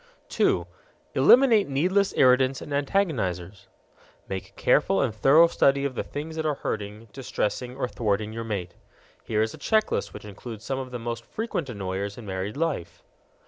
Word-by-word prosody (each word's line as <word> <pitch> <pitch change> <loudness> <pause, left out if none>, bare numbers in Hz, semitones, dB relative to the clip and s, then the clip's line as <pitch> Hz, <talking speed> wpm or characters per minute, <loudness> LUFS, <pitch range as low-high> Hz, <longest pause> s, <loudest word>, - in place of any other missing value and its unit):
2. - - +2 0.5
Eliminate 235 - +6
needless 185 +8 +2
irritants 130 +1 +4
and - - -9
antagonizers. 120 - -1 0.6
Make 95 -1 -5
a - - -30
careful 95 - +2
and 125 -5 +1
thorough 135 +10 +6
study 140 -4 +2
of 140 - -2
the - - -2
things 160 +2 -6
that 160 - -2
are 150 - 0
hurting, 105 -1 -5
distressing, 125 -1 -3
or 130 - -1
thwarting 105 -2 -1
your 115 0 -4
mate. 100 -6 -4 0.5
Here 110 -1 +1
is 110 - -3
a - - -11
check 220 -1 +1
list - - -1
which 105 - -10
includes 110 +1 -9
some 135 -1 -2
of 130 -1 -6
the 125 - -5
most 115 0 -5
frequent 210 - -4
annoyers 100 -2 -4
in 120 - -9
married 95 +4 -4
life. 140 - -3
125 Hz, 175 wpm, -26 LUFS, 105-145 Hz, 0.6 s, Eliminate